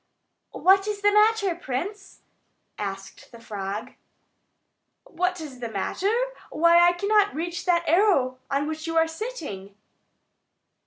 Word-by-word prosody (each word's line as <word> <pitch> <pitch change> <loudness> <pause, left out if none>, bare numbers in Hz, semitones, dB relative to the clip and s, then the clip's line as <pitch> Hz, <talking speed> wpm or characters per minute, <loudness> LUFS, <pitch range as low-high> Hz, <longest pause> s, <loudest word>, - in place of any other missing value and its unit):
"What 390 +2 +4
is 415 -1 -3
the 410 - +5
matter, 420 -2 +3
prince?" 355 +6 -6 0.6
asked 195 +2 -7
the 235 - -13
frog. 205 -2 -5 1.1
"What 360 +1 -2
is 285 -5 -9
the 235 -2 -5
matter? 225 - -1 0.4
Why, 335 +2 +4
I 345 0 +6
cannot 405 +1 +2
reach 345 +3 -4
that 345 -2 +2
arrow 310 -8 +3
on 280 +1 0
which 315 +1 -5
you 330 0 -1
are 325 0 +4
sitting." 320 - -7
335 Hz, 125 wpm, -25 LUFS, 255-390 Hz, 1.1 s, I